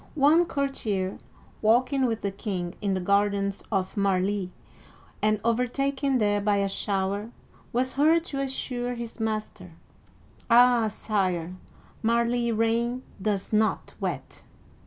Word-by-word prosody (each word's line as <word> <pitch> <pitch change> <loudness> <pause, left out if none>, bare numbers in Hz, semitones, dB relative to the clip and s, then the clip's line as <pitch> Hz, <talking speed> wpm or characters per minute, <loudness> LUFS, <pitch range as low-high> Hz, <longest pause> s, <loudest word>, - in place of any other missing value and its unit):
One 310 +4 +5
courtier, 220 - -2 0.4
walking 255 +4 +3
with 225 -1 -2
the 200 - -1
king 190 -4 -4
in 200 -2 0
the - - -1
gardens 200 +1 +1
of 190 -3 -1
Marly 195 -3 +2
(mar - - +1
lee') 200 -3 -2 0.7
and 215 0 +2
overtaken 265 +3 +1
there 205 -2 +2
by 205 0 +2
a 200 0 +1
shower, 195 +1 -2 0.4
was 255 +2 0
heard 320 +4 +4
to 275 -5 -3
assure 245 -2 -3
his 235 0 -7
master, 215 -5 -4 0.4
" - - -29
Ah, 240 -1 +6
Sire, 185 -5 -1 0.5
Marly 235 +1 +1
rain 230 +3 0 0.2
does 205 0 -1
not 215 0 +1
wet - - -4
220 Hz, 135 wpm, -26 LUFS, 200-245 Hz, 0.7 s, Ah